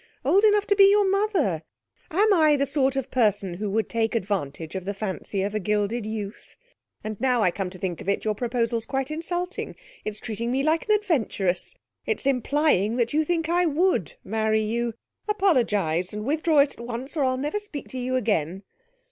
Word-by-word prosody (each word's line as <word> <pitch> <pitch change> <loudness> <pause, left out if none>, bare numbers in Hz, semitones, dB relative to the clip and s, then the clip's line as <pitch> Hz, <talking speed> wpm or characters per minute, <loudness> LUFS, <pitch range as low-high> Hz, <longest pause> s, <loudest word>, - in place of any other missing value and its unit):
Old 400 +2 +4
enough 415 -1 +4
to 405 - +2
be 395 -1 +7
your 405 0 +4
mother! 380 - +1 0.5
Am 410 +5 +3
I 310 -4 +5
the 280 0 +1
sort 275 -1 +1
of 270 -1 -3
person 205 -7 +2
who 205 +4 -3
would 220 +2 0
take 225 0 -1
advantage 170 -7 -3
of 190 -2 -5
the 200 +1 -3
fancy 195 -1 -3
of 200 +1 -2
a 215 - 0
gilded 210 +3 -1
youth? 215 -1 -6 0.5
And, 215 0 -6
now 250 -3 +2
I 180 - +3
come 190 0 -3
to 185 - -9
think 180 -3 -4
of - - -4
it, 200 - 0
your 215 - +1
proposal's 230 0 -1
quite 270 +1 -2
insulting. 350 +3 -3 0.3
It's 215 0 -4
treating 230 +2 -3
me 265 +2 +1
like 320 +7 +1
an 425 - +6
adventuress! 260 - 0 0.3
It's 445 - -1
implying 270 - +2
that 240 0 0
you 310 +1 +3
think 325 0 -1
I 350 +1 +2
would 320 - +1
marry 220 +1 +1
you! 230 +1 -2 0.3
Apologise, 210 - +1
and 210 0 -5
withdraw 310 +1 +3
it 280 - +1
at - - -7
once, 245 +5 -5
or 295 - +1
I'll 255 -1 +1
never 295 +10 -2
speak 410 -9 -6
to 260 - -5
you 255 +1 -1
again.' 195 -6 0
240 Hz, 200 wpm, -25 LUFS, 210-310 Hz, 0.5 s, be